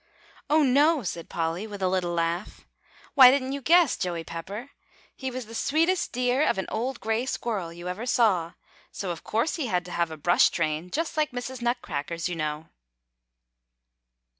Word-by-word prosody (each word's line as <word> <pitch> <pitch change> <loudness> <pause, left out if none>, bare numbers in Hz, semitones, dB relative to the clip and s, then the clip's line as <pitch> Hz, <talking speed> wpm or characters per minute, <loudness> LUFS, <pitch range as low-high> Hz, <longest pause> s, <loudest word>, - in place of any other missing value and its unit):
"Oh, 305 +1 +4
no!" 285 +2 +4
said 170 -3 -5
Polly 165 +5 -2
with 205 -2 -8
a - - +3
little 185 -1 0
laugh. 170 +3 -2 0.5
"Why, 260 -3 +10
didn't 260 0 +1
you 280 0 -4
guess, 335 +1 +5
Joey 170 -2 -3
Pepper? 200 +12 -7 0.4
He 265 - -4
was 255 -1 -5
the 225 - -12
sweetest 325 +9 +1
dear 250 +2 +1
of - - +2
an 190 - -2
old 240 +3 -2
gray 225 +3 -1
squirrel 210 -10 -3
you 175 +1 -9
ever 210 +7 -4
saw; 185 -9 +2 0.4
so 190 -3 -4
of 170 - -7
course 230 +11 0
he 295 -6 -2
had 180 -5 0
to 180 - -9
have 170 -1 0
a 160 - -7
brush 175 +4 +4
train, 155 +1 -2
just 320 - -3
like 305 -1 +2
Mrs. 245 0 -6
Nutcracker's, 170 - -2
you 175 - -3
know." 155 0 -4
220 Hz, 180 wpm, -26 LUFS, 170-260 Hz, 0.5 s, Why